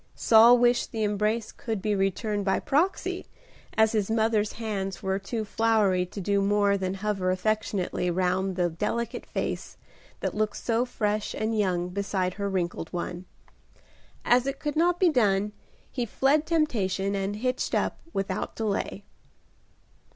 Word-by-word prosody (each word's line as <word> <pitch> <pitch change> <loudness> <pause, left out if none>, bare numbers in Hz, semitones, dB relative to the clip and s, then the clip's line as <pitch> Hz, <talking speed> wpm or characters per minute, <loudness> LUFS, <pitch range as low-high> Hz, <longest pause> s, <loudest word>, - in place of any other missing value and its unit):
Saul 230 +2 +7
wished 240 0 +2
the 225 -2 -2
embrace 210 +2 0
could 220 -3 -4
be 210 +2 0
returned 200 +2 0
by 190 -1 +1
proxy, 320 +8 0 0.5
as 220 0 +5
his 215 -3 0
mother's 220 -1 +1
hands 200 -4 -4
were 190 0 0
too 220 +2 -4
floury 205 -4 +2
to 200 - -8
do 200 +1 +1
more 200 0 +3
than 190 -1 -2
hover 195 -2 -1
affectionately 185 -2 -1
round 185 +1 0
the 175 -2 +1
delicate 235 +8 -3
face - - -4 0.4
that - - -1
looked 215 0 -1
so 235 +1 0
fresh 210 -3 -2
and 220 +1 -1
young 180 -4 0
beside 190 -1 -1
her 200 0 -3
wrinkled 175 -3 -2
one. 175 0 -4 1.0
As 245 +2 +4
it 275 0 -2
could 295 0 -3
not 345 +2 +2
be 365 - +5
done, 210 -7 +2 0.4
he 245 -3 -2
fled 280 +7 +2
temptation 200 - 0
and 195 +1 -2
"hitched 255 +4 -1
up" - - 0
without 195 - -3
delay. 205 -2 -2
210 Hz, 150 wpm, -27 LUFS, 195-230 Hz, 1.0 s, Saul